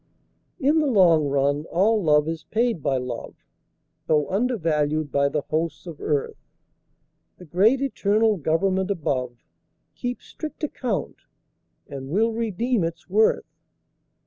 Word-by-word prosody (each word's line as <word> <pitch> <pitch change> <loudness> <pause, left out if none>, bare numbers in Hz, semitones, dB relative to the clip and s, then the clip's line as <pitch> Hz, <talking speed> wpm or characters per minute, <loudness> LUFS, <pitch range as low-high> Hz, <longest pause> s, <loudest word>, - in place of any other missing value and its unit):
In 300 +2 +3
the 305 - +1
long 175 - +4
run 140 +2 +1
all 210 +5 +2
love 150 -3 +3
is 165 0 -4
paid 230 -6 0
by 135 -2 +1
love, 125 -2 -5 0.7
Though 150 -2 +2
undervalued 155 - 0
by 140 0 +2
the 150 +1 -1
hosts 160 +1 -3
of 165 -4 -9
earth; 145 -2 -2 0.9
The 180 - -12
great 210 - +3
eternal 215 -4 +2
Government 185 +5 0
above 130 - -2 0.5
Keeps 245 0 -5
strict 310 0 -8
account 250 -8 -3 0.7
and 135 -1 -7
will 220 +8 +1
redeem 230 0 0
its 165 +1 -5
worth. 215 +3 +3
170 Hz, 125 wpm, -24 LUFS, 150-220 Hz, 0.9 s, long